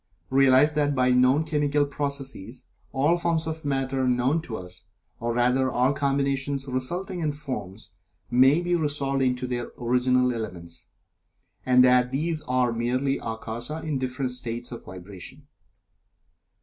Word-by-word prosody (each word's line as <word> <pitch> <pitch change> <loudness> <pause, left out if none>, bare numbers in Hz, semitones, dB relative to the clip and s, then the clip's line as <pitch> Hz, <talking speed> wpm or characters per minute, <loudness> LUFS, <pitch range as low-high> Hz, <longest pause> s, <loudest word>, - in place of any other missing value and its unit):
Realize 135 +2 +5
that 145 -1 +1
by 125 -1 +3
known 130 +4 +4
chemical 145 -2 +1
processes 140 -5 -4 0.3
all 145 +6 +2
forms 170 -2 0
of 160 0 -5
Matter 135 -2 -1
known 125 +6 +1
to 125 -9 -6
us, 90 0 -9 0.3
or 120 +1 -2
rather 125 +2 +2
all 125 +2 +2
combinations 140 0 -1
resulting 175 +9 -2
in 155 -3 0
"forms," 110 -9 -6 0.4
may 135 +6 +5
be 175 0 -1
resolved 145 -4 0
into 125 -1 0
their 120 -1 -4
original 125 +1 +2
elements, 85 -7 -7 0.8
and 125 0 +6
that 125 0 +4
these 155 +3 0
elements - - -12
are 125 -2 +2
merely 125 +4 0
Akasa 115 +7 -5
in 150 -4 -2
different 130 0 -2
states 120 -1 -4
of 120 - -8
vibration. 95 +9 -10
130 Hz, 140 wpm, -25 LUFS, 125-145 Hz, 0.8 s, and